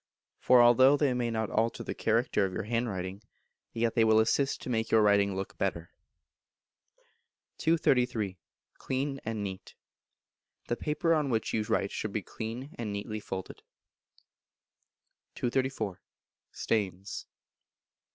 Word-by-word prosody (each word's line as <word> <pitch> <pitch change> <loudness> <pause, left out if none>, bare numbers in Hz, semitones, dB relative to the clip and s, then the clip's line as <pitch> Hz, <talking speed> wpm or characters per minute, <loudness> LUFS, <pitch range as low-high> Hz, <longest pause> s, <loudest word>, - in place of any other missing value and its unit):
For 125 -1 +6
although 130 +4 +6
they 140 -3 +2
may 120 -1 -1
not 110 -2 -2
alter 115 +1 0
the - - -4
character 115 -2 +1
of 95 - 0
your - - -3
handwriting, 100 -4 -2 0.5
yet 115 0 0
they 115 - +4
will 110 0 +5
assist 135 +5 +1
to - - -6
make 110 -1 0
your 110 -1 +5
writing 100 -1 +3
look 95 0 -5
better. 85 -4 -2 1.7
233. 125 - +1 0.4
Clean 135 +1 -2
and 110 -2 -3
Neat. 95 -2 -7 0.9
The 120 - +1
paper 155 +5 0
on 150 -3 +1
which 110 -3 -1
you 110 - +1
write 100 -1 0
should 110 -2 -4
be 105 - -2
clean, 115 - -6
and 110 -3 -3
neatly 105 +1 -4
folded. 95 -2 -7 1.7
234. 120 -6 -2 0.5
Stains. 100 -2 -2
110 Hz, 130 wpm, -30 LUFS, 100-125 Hz, 1.7 s, For